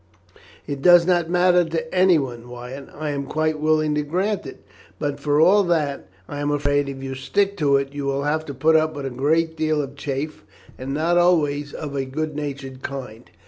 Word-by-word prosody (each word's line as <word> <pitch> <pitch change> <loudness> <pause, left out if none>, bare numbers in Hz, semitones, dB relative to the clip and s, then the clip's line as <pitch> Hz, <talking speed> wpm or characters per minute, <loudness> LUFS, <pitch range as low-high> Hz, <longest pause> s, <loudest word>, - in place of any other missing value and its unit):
"It 140 -1 -5
does 175 +1 +7
not 175 -2 +2
matter 180 0 +4
to 160 -1 -4
anyone, 140 -11 +2
Wyatt. 125 +3 -8
I 150 0 -3
am 140 -1 -4
quite 155 +1 -1
willing 155 0 +2
to 150 - +1
grant 185 +7 -1
it, - - -11 0.3
but 145 -1 -3
for 145 0 +1
all 190 +6 +6
that, 155 -5 -1 0.2
I 145 - -6
am 145 0 -1
afraid, 145 -1 +1
if 135 -1 -7
you 135 0 -4
stick 195 +10 0
to 140 -5 +3
it, 140 0 -3
you 145 -1 -4
will 140 0 -1
have 155 +2 0
to 140 - -6
put 155 +5 +3
up 155 -1 +2
with 145 -1 -5
a 135 - -3
great 160 +6 +1
deal 155 -1 0
of 140 -1 -4
chaff, 140 -1 -4 0.3
and 130 +1 -6
not 170 +3 +2
always 150 -5 +2
of 145 -2 -6
a 135 -1 -1
good 155 +3 -4
natured 140 -3 -6
kind." 125 -5 -7
145 Hz, 205 wpm, -22 LUFS, 140-160 Hz, 0.3 s, does